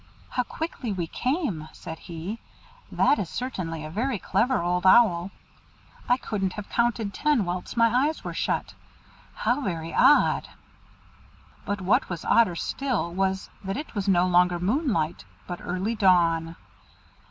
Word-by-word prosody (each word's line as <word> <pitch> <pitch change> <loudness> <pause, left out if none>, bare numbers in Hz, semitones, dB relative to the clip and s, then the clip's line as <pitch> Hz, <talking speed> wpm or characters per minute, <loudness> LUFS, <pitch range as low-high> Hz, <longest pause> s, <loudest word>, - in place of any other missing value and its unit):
"How 250 - 0
quickly 260 -3 -5
we 180 -4 -2
came!" 240 - -2
said 160 -1 -8
he; 175 +7 -6 0.5
"that 290 - +3
is 180 - -3
certainly 165 -11 -4
a 155 - -7
very 240 +6 -1
clever 235 +8 +1
Old 180 +1 0
Owl. 185 -3 +5 0.8
I 245 - +5
couldn't 195 -7 -2
have 210 -1 -7
counted 235 -3 0
ten 295 -9 +1
whilst 180 +6 -4
my 235 +4 +4
eyes 315 - -4
were - - -5
shut. - - -2 0.6
How 245 +6 0
very 165 - -4
odd!" 295 - +4 1.2
But 205 -1 -2
what 220 +9 +2
was 175 -3 -5
odder 225 -7 +4
still 240 -4 -2
was, 190 +1 -1
that 195 +1 -3
it 305 - -6
was 200 -2 -3
no 180 -2 +4
longer 180 0 +3
moonlight, 205 - 0 0.2
but 175 -1 -6
early 185 +5 -2
dawn. 170 -5 +3
195 Hz, 145 wpm, -26 LUFS, 175-240 Hz, 1.2 s, Owl